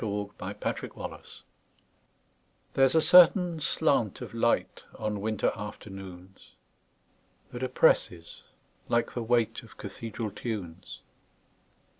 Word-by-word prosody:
Part 105 Hz, -2 st, -3 dB, 0.3 s
Two: -, -, -3 dB
Nature -, -, -3 dB
LXXXII -, -, -9 dB, 1.3 s
THERE'S 135 Hz, +1 st, +4 dB
a 160 Hz, -, +5 dB
certain 180 Hz, -1 st, +6 dB
slant 140 Hz, -, +1 dB
of -, -, -7 dB
light, -, -, 0 dB
On 105 Hz, -2 st, -3 dB
winter 110 Hz, -1 st, 0 dB
afternoons, 95 Hz, -3 st, -10 dB, 1.0 s
That 120 Hz, -, -7 dB
oppresses, 90 Hz, -9 st, +1 dB, 0.5 s
like 120 Hz, 0 st, +1 dB
the 120 Hz, -, -3 dB
weightOf 115 Hz, 0 st, -1 dB
cathedral 110 Hz, +1 st, -6 dB
tunes. 95 Hz, -6 st, -6 dB
110 Hz, 100 wpm, -28 LUFS, 100-125 Hz, 1.3 s, certain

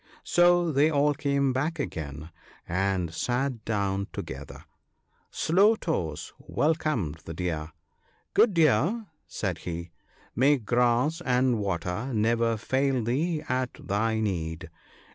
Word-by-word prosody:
So 175 Hz, -1 st, +4 dB
they 145 Hz, +2 st, +4 dB
all 145 Hz, -1 st, +3 dB
came 140 Hz, -2 st, +1 dB
back 150 Hz, +6 st, -1 dB
again, 75 Hz, -, -5 dB, 0.4 s
and 90 Hz, -2 st, 0 dB
sat 125 Hz, +2 st, -1 dB
down 100 Hz, -2 st, -1 dB
together. 70 Hz, +1 st, -8 dB, 0.6 s
Slow 200 Hz, +7 st, +3 dB
toes 85 Hz, -, -3 dB
welcomed 145 Hz, -, -1 dB
the 80 Hz, -, -6 dB
Deer. 80 Hz, -3 st, -3 dB, 0.6 s
"Good 220 Hz, -5 st, +4 dB
Deer," 165 Hz, -, +3 dB, 0.2 s
said 90 Hz, -5 st, -3 dB
he, 85 Hz, 0 st, -6 dB, 0.4 s
"may 140 Hz, +4 st, +4 dB
grass 125 Hz, +7 st, +1 dB
and 125 Hz, -2 st, +2 dB
water 95 Hz, +5 st, -2 dB
never 115 Hz, +1 st, +2 dB
fail 130 Hz, +2 st, 0 dB
thee 150 Hz, +7 st, 0 dB
at 130 Hz, -1 st, -1 dB
thy 110 Hz, +2 st, -1 dB
need. 85 Hz, -5 st, -3 dB
120 Hz, 115 wpm, -27 LUFS, 90-145 Hz, 0.6 s, So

